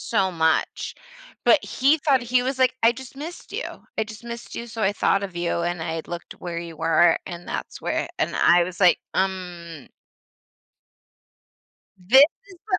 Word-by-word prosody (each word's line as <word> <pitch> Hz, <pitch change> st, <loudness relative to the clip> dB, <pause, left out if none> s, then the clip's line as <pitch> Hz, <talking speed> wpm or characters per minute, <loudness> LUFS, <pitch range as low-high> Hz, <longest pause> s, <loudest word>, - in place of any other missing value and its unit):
so 195 Hz, -4 st, 0 dB
much, 160 Hz, -2 st, 0 dB, 0.5 s
but 300 Hz, -, +5 dB
he 280 Hz, +4 st, +2 dB
thought 275 Hz, -4 st, +2 dB
he 245 Hz, +1 st, +2 dB
was 260 Hz, +1 st, -2 dB
like, 255 Hz, 0 st, +4 dB
"I 230 Hz, -, +6 dB
just 265 Hz, +1 st, -11 dB
missed 320 Hz, +5 st, -8 dB
you, -, -, -3 dB, 0.3 s
I 220 Hz, -, +2 dB
just 215 Hz, +1 st, -11 dB
missed 235 Hz, 0 st, -8 dB
you, 235 Hz, -, -5 dB
so 225 Hz, 0 st, -5 dB
I 200 Hz, 0 st, +3 dB
thought 200 Hz, -1 st, +1 dB
of 190 Hz, -3 st, -7 dB
you, 170 Hz, 0 st, -1 dB
and 175 Hz, -1 st, -2 dB
I 160 Hz, 0 st, -3 dB
looked 175 Hz, -1 st, -7 dB
where 170 Hz, -1 st, -6 dB
you 170 Hz, -2 st, -8 dB
were, 165 Hz, +1 st, +4 dB
and 175 Hz, -1 st, -8 dB
that's -, -, -5 dB
where" -, -, -1 dB
and -, -, 0 dB
I 175 Hz, 0 st, +5 dB
was 180 Hz, 0 st, -8 dB
like, 180 Hz, -2 st, +6 dB, 0.2 s
"Um" 175 Hz, -5 st, -3 dB, 2.1 s
this 235 Hz, +10 st, +6 dB, 0.3 s
is 365 Hz, -, -14 dB
the 370 Hz, -, +1 dB
190 Hz, 180 wpm, -24 LUFS, 170-250 Hz, 2.1 s, I